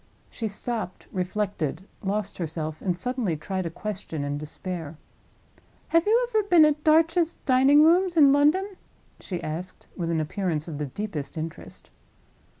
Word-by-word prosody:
She 225 - -3
stopped, 215 -2 -5
reflected, 185 -3 -2
lost 205 +1 -2
herself, 155 -2 -4
and 180 -3 -1
suddenly 230 -5 -2
tried 185 +3 -3
a - - -3
question 180 -4 -5
in 145 0 -3
despair. 160 +1 -6 0.9
"Have 330 +3 +3
you 470 +3 +4
ever 440 -3 +2
been 350 -6 +6
at 300 0 +1
Darch's 330 +2 +3
Dining 270 +3 +6
rooms 350 +2 +4
in 280 -3 +7
London?" 300 +7 +3 0.5
she 180 -3 -5
asked, 170 +4 -6
with 170 -2 -3
an 165 -1 +1
appearance 160 -1 -2
of 150 -3 -6
the 150 - -2
deepest 165 -2 -5
interest. 160 +1 -8
195 Hz, 150 wpm, -26 LUFS, -, 0.9 s, in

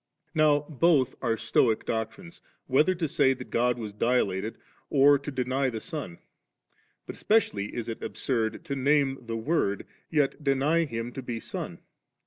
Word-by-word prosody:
Now 150 -2 +4
both 145 -3 +3
are 115 -3 0
Stolen 110 -1 +2
doctrines, 115 - -4 0.2
whether 150 +8 +3
to 170 -2 -1
say 135 -2 +3
that 125 - -10
God 125 +1 +2
was 110 -3 -6
dilated 110 -2 0 0.3
or 140 0 +5
to 140 - -6
deny 130 0 0
the 115 -3 -4
Son, 130 - -6 0.9
but - - -7
especially 105 - +1
is 120 - -4
it 115 - -5
absurd 115 -4 -2
to 140 - -3
name 140 0 +2
the 115 -1 -4
Word, 110 -5 0 0.2
yet 150 -1 0
deny 145 +4 +2
Him 115 -3 -4
to 135 - -6
be 120 -2 -4
Son. - - -6
130 Hz, 155 wpm, -27 LUFS, 115-145 Hz, 0.9 s, or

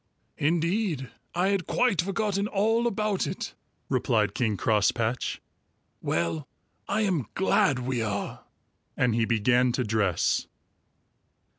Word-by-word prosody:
"Indeed, 165 - 0 0.2
I 180 +3 +2
had 195 -4 0
quite 245 -9 +2
forgotten 200 +1 -1
all 225 +4 +2
about 210 -3 0
it," - - -5 0.3
replied 105 -3 +1
King 110 -4 0
Crosspatch. 110 +4 +1 0.6
"Well, 85 -3 -1 0.4
I 215 +2 +1
am 180 - 0
glad 145 -7 +3
we 125 -1 -2
are," 105 -2 -3 0.5
and 125 -2 +2
he 115 0 +2
began 120 +3 +3
to 125 - 0
dress. 105 -6 +1
130 Hz, 115 wpm, -27 LUFS, -, 0.6 s, glad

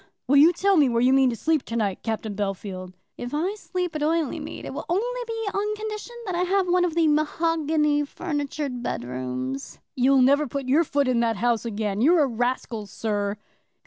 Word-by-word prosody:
"Will 280 +3 +5
you 310 +5 +8
tell 385 +2 +2
me 285 -4 +5
where 235 -1 +1
you 250 +2 +4
mean 265 -1 +5
to 235 - -2
sleep 315 +4 +1
to 230 - -5
night, 205 -5 -1
Captain 220 -1 -3
Bellfield?" 195 -2 -4 0.3
"If 245 +4 -4
I 350 +7 0
sleep 360 -5 -4
at 305 - -2
Oileymead 315 -1 -1
it - - -6
will - - -6
only 485 +8 -1
be 450 -2 -3
on 420 +1 -1
condition 430 +2 -6
that 375 - -3
I 345 - 0
have 375 +1 +1
one 355 0 +3
of 335 -2 -2
the 330 -2 +3
mahogany 305 -1 +1
furnitured 290 -4 -4
bedrooms." 130 - -4 0.2
"You'll 265 +1 +4
never 285 +3 +4
put 275 +1 -4
your 295 +6 +4
foot 285 -3 0
in 250 -2 +2
that 230 -1 +1
house 235 +3 0
again. 210 -2 -2
You're 320 +4 +5
a - - +2
rascal, 240 -3 -2
sir." 205 0 -2
280 Hz, 200 wpm, -25 LUFS, 225-335 Hz, 0.3 s, you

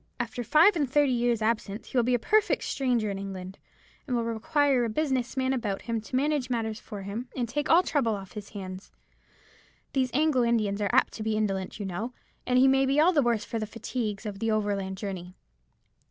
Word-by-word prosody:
After 240 0 -3
five 315 - +5
and 290 -6 0
thirty 290 0 +3
years' 240 -2 +1
absence 215 -1 -2
he - - -12
will 245 - +4
be 245 +1 +2
a - - +3
perfect 425 - +2
stranger 245 -6 0
in 195 - -4
England, 190 -1 -7 0.5
and 255 - 0
will 235 - +1
require 250 +4 +1
a 230 - 0
business 265 0 -1
man 260 0 +1
about 210 -6 -2
him 230 -2 -2
to 225 - -6
manage 280 -1 +1
matters 225 -3 -2
for 205 -3 -8
him, 215 +6 -5
and 245 -2 -1
take 290 +6 -2
all 345 +3 +6
trouble 250 -10 +1
off 195 -2 -9
his 205 -1 -8
hands. 190 -2 -8 1.0
These 260 -2 +1
Anglo 295 -2 +2
Indians 215 -4 +1
are 205 - +1
apt - - +3
to - - -7
be 220 0 0
indolent, 195 -2 -2
you 205 - -3
know, 210 +7 -4 0.3
and 250 0 +3
he 260 +1 +6
may 270 0 +4
be 275 +2 +2
all 345 +4 +5
the 295 - +4
worse 235 -4 +1
for 230 - -3
the 215 - -3
fatigues 225 -1 -4
of 200 -2 -5
the 225 - 0
overland 200 -3 -1
journey. 185 -3 -6
230 Hz, 215 wpm, -28 LUFS, 205-260 Hz, 1.0 s, all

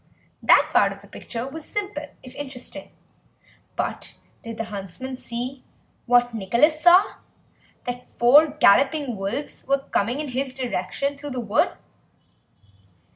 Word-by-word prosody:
That - - +5
part - - +4
of - - -10
the - - -15
picture 235 +1 -6
was 310 +3 -8
simple, 390 -8 -4 0.2
if 255 - -11
interesting, 270 -3 -7 0.9
but - - -4 0.3
did 230 -1 -8
the 225 - -2
huntsman 200 +7 -6
see, 255 +2 -6 0.4
what 245 0 +4
Nicholas 235 - +2
saw, 360 +4 +6 0.7
that 245 0 -5
four 280 +6 +7
galloping 280 -1 +3
wolves 205 +9 -4
were 275 +1 +3
coming 235 +7 0
in 300 -2 -4
his 260 +1 -3
direction 260 +3 -2
through 290 - -6
the 255 -2 -4
wood? 215 -4 +1
255 Hz, 130 wpm, -24 LUFS, 235-290 Hz, 0.9 s, four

